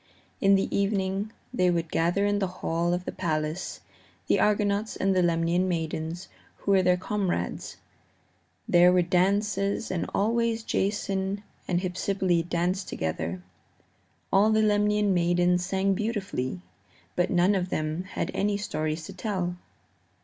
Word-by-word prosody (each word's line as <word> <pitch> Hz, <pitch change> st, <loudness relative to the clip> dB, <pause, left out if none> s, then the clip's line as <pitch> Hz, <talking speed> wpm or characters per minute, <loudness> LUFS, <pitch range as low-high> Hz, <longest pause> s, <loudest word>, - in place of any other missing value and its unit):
In 195 Hz, -1 st, +5 dB
the 195 Hz, -, 0 dB
evening 200 Hz, +1 st, 0 dB, 0.2 s
they 180 Hz, -7 st, +3 dB
would 170 Hz, -2 st, -1 dB
gather 175 Hz, +5 st, +1 dB
in 205 Hz, 0 st, +1 dB
the 195 Hz, -, 0 dB
hall 170 Hz, -1 st, -1 dB
of 180 Hz, +1 st, -1 dB
the -, -, -3 dB
palace, 155 Hz, +1 st, -3 dB, 0.4 s
the -, -, +2 dB
Argonauts 210 Hz, 0 st, +1 dB
and 195 Hz, 0 st, +1 dB
the 185 Hz, -, +4 dB
Lemnian 170 Hz, +1 st, +2 dB
maidens 165 Hz, +1 st, -3 dB, 0.3 s
who 200 Hz, -, -2 dB
were 195 Hz, -1 st, +5 dB
their 180 Hz, 0 st, +3 dB
comrades. 185 Hz, -, -2 dB, 0.9 s
There 175 Hz, +1 st, +6 dB
were 180 Hz, -1 st, +4 dB
dances, 200 Hz, +4 st, +1 dB
and 180 Hz, -, -2 dB
always 230 Hz, +2 st, +1 dB
Jason 195 Hz, -1 st, -1 dB, 0.2 s
and 175 Hz, -1 st, +1 dB
Hypsipyle 180 Hz, -2 st, 0 dB
danced 180 Hz, +3 st, -1 dB
together. 80 Hz, +2 st, -3 dB, 0.9 s
All 200 Hz, +3 st, +5 dB
the 220 Hz, 0 st, +3 dB
Lemnian 210 Hz, -1 st, +2 dB
maidens 175 Hz, 0 st, +2 dB
sang 195 Hz, +1 st, +1 dB
beautifully, 195 Hz, -, -3 dB, 0.5 s
but 175 Hz, -, +1 dB
none 180 Hz, +2 st, +3 dB
of 185 Hz, -2 st, -1 dB
them 155 Hz, +3 st, -2 dB
had 195 Hz, -, -3 dB
any 205 Hz, 0 st, 0 dB
stories 155 Hz, -5 st, -3 dB
to -, -, -8 dB
tell. 185 Hz, -5 st, -2 dB
185 Hz, 140 wpm, -27 LUFS, 175-200 Hz, 0.9 s, There